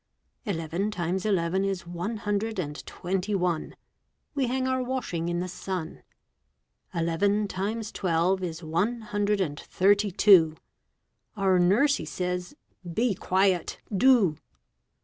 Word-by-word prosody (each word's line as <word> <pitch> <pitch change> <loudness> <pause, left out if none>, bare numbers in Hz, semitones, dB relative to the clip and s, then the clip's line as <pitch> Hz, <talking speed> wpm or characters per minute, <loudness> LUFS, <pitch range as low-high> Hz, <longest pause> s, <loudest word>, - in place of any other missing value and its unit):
Eleven 170 0 -2
times 185 0 -2
eleven 190 -1 +1
is 195 -2 -2
one 175 +6 -4
hundred 210 +1 -2
and 150 -5 -4
twenty 190 +3 -2
one. 180 -4 -1 0.6
We 275 -4 0
hang 260 +1 0
our 260 0 +1
washing 245 -10 -2
in 175 0 -1
the 180 - -3
sun. 180 -2 -5 0.9
Eleven 200 +5 +1
times 210 +3 -3
twelve 180 +1 +1
is 170 -1 -5
one 190 +10 0
hundred 205 -1 0
and 145 -6 -2
thirty 200 +2 +2
two. 175 -5 +6 0.8
Our 190 -2 +3
nursie 225 +12 +3
says, 180 0 -3 0.4
"Be 230 +6 +1
quiet, 185 -1 +1 0.2
do!" 205 - +4
190 Hz, 125 wpm, -27 LUFS, 175-210 Hz, 0.9 s, two